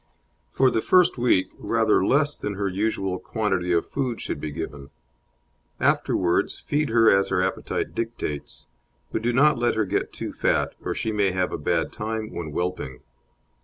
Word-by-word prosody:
For 130 -1 +3
the 110 - +1
first 180 -4 +4
week 120 -6 +2
rather 110 -1 +2
less 145 +6 +2
than 105 - -4
her 100 0 -1
usual 95 -1 -1
quantity 95 -6 -1
of 85 -1 +2
food 130 -4 -2
should 75 - -4
be 75 - -3
given; 70 -2 -6 0.9
afterwards 85 -2 +1
feed 150 +1 0
as 110 -4 +5
her 90 -1 +1
appetite 95 - -2
dictates, 115 -11 -4 0.5
but - - -1
do 120 +2 +1
not 140 +2 +4
let 120 0 +1
her 110 -1 +1
get - - -1
too - - -6
fat, - - +1
or - - -2
she 110 - -2
may 105 -2 +2
have 95 -1 0
a - - -2
bad 75 - 0
time 110 0 -4
when 85 - -4
whelping. 80 -6 -3
105 Hz, 165 wpm, -24 LUFS, 90-115 Hz, 0.9 s, as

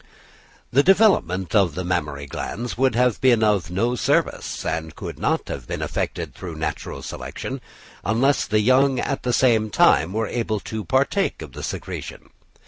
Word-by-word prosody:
The 135 - +5
development 145 - +3
of 95 -8 +3
the 95 - -3
mammary 75 -5 -2
glands 115 - -5
would 130 -1 +2
have 125 -1 +2
been 120 -4 +4
of 100 -7 +2
no 110 +7 0
service, 125 - 0
and 80 -1 -3
could - - -7
not - - 0
have - - -6
been - - -3
affected - - -3
through 85 -3 -7
natural 80 0 -4
selection, 135 0 -6 0.4
unless 120 +8 +2
the 105 0 +2
young 130 +3 +4
at 140 - -2
the 125 - -1
same 115 -3 +3
time 80 -4 +4
were 110 +1 0
able 110 -2 -2
to 110 -1 -5
partake 140 - 0
of - - -10
the - - -8
secretion. - - -6
110 Hz, 165 wpm, -23 LUFS, 90-130 Hz, 0.4 s, The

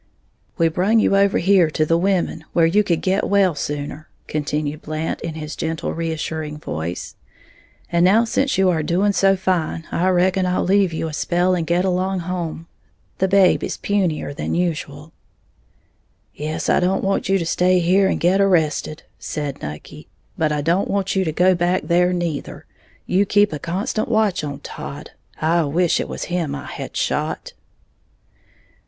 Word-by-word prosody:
"We 165 - +3
brung 185 +7 +2
you 195 - +3
over 200 0 +3
here 185 -2 +4
to 155 0 0
the 165 - +2
women, 175 -2 0
where 170 - +4
you 200 +6 +3
could 170 -5 0
get 190 +2 +1
well 195 -3 +3
sooner," 145 +1 -5 0.2
continued 150 0 -3
Blant, 155 +1 -4
in 165 -1 -5
his 155 -1 -6
gentle, 160 0 -3
reassuring 160 -2 -4
voice; 80 - -5 0.8
"and 170 0 +3
now 205 +6 +5
since 270 +4 0
you 190 0 +3
are 160 -2 0
doing 180 +6 +1
so 195 -1 +3
fine, 180 -4 -1
I 180 +2 +1
reckon 185 +1 +2
I'll 180 - 0
leave 195 -1 +3
you 160 0 -3
a 155 - -6
spell 175 +4 +1
and 170 -3 -1
get 175 +2 +1
along 185 0 0
home, 170 -2 -4 0.5
the 190 - +2
babe 195 -1 +4
is - - -3
punier 180 -8 -1
than - - -3
usual." 155 -3 -3 1.2
"Yes, 155 +1 -4
I - - +3
don't 185 +2 0
want 195 -1 0
you 195 - +4
to 170 - -2
stay 180 +2 +2
here 185 +3 +3
and - - 0
get 185 +3 +3
arrested," 160 -5 +1 0.2
said 145 -3 -5
Nucky; 75 +1 -8 0.3
"but 155 -1 0
I 150 -1 0
don't 170 +6 +1
want 195 -1 -1
you 190 - +2
to 160 - -1
go 180 +4 +3
back 175 +1 0
there 180 +1 +2
neither. 175 -4 -4 0.4
You 195 +2 +2
keep 205 -3 +3
a 150 - -4
constant 195 - -2
watch 215 -7 +1
on 145 -2 -5
Todd, - - -8 0.3
I 165 +2 +2
wish 170 +4 +1
it - - -3
was - - -5
him 170 -5 -2
I 140 - -7
had - - -7
shot." - - -2
175 Hz, 175 wpm, -21 LUFS, 155-190 Hz, 1.2 s, now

